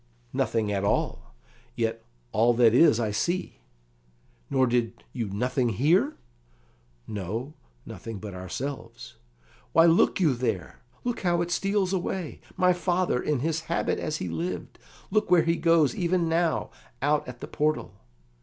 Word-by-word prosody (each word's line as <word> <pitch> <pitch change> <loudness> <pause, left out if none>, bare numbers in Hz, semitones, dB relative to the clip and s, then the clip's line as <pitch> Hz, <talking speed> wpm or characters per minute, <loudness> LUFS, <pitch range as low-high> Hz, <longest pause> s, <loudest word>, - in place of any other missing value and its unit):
"Nothing 110 -3 0
at 100 -1 -1
all; 100 -9 -1 0.4
yet 115 0 -1 0.3
all 115 - +3
that 115 -2 +5
is, 130 -2 +6
I 110 -3 0
see." 175 - -2 0.9
"Nor 130 -1 +3
did 120 -1 -1
you 115 -5 -3
nothing 125 +5 0
hear?" 150 - +2 0.9
"No, 110 - -4 0.3
nothing 115 -2 -7
but 100 0 -7
ourselves." 105 +10 -6 0.6
"Why, 165 - +7
look 170 +3 +4
you 160 -7 +4
there! 115 -8 -3 0.2
Look 245 -1 -2
how 175 -2 +1
it 175 - -5
steals 195 +1 +1
away! 180 -2 -3 0.2
My 180 0 +4
father, 175 -6 0
in 145 -5 0
his 160 +1 -1
habit 170 - 0
as 155 0 -2
he 90 - -4
lived! 85 +2 -4 0.3
Look 215 -1 +1
where 175 -2 +6
he 165 +1 +2
goes, 165 -6 +3
even 175 -1 +1
now, 165 0 0 0.3
out 145 0 +2
at 125 -1 -8
the - - -7
portal." 155 +1 -1
140 Hz, 145 wpm, -27 LUFS, 115-170 Hz, 0.9 s, Why